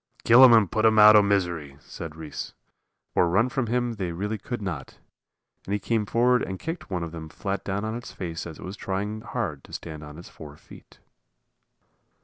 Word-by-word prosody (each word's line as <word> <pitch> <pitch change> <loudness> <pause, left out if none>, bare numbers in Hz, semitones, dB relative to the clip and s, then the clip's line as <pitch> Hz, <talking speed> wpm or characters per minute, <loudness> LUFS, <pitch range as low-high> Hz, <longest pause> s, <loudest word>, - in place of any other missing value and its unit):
"Kill 120 +3 +8
'em 130 - +9
and 110 -5 +5
put 110 - 0
'em 110 -1 +4
out 105 0 +9
o' 105 - +8
misery," 90 -8 -1
said 80 +1 -9
Reese, 80 -2 -7 0.6
for 85 - +3
run 105 +8 +2
from 125 -1 -2
him 120 +1 0
they 95 -5 -4
really 105 +5 -3
could 120 +4 -5
not, 90 -9 -6 0.7
and 100 - -3
he - - -2
came 110 0 -1
forward 125 +3 +3
and 95 - -4
kicked 165 0 -6
one 90 -3 -2
of 85 - -6
them 80 -1 -8
flat 100 +4 -4
down 100 +2 -3
on 110 - -3
its 120 0 -7
face 85 -2 -6
as 80 - -9
it - - -10
was 95 +2 -6
trying 105 +2 -4
hard 105 - -4
to - - -16
stand 80 -2 -7
on 75 0 -10
its 85 - -11
four 75 -2 -12
feet. - - -16
100 Hz, 210 wpm, -25 LUFS, 85-110 Hz, 0.7 s, em